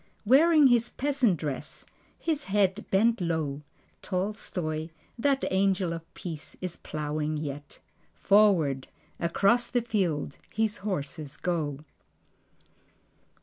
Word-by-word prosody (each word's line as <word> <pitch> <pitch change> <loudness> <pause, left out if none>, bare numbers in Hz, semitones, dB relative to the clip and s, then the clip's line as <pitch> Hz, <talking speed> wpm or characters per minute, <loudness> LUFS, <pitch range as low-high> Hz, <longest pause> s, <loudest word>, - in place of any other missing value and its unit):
Wearing 300 +6 +6
his 240 -2 +4
peasant 265 -9 +1
dress, 145 -4 -5 0.3
his 310 -3 -2
head 200 0 +1
bent 225 +2 +3
low, 160 -4 -1 0.4
Tolstoi, 180 -5 -3 0.3
that 275 +2 +2
angel 190 -2 +2
of 165 0 -8
Peace, 160 -4 -7
is 180 -2 -4
plowing 150 0 -3
yet; 145 -1 -6 0.4
Forward, 180 -10 +3 0.3
across 200 +8 +2
the 245 -1 0
field, 180 - -1
his 220 -1 0
horses 150 -6 -4
go. 150 -5 -2
185 Hz, 105 wpm, -28 LUFS, 155-220 Hz, 0.4 s, Wearing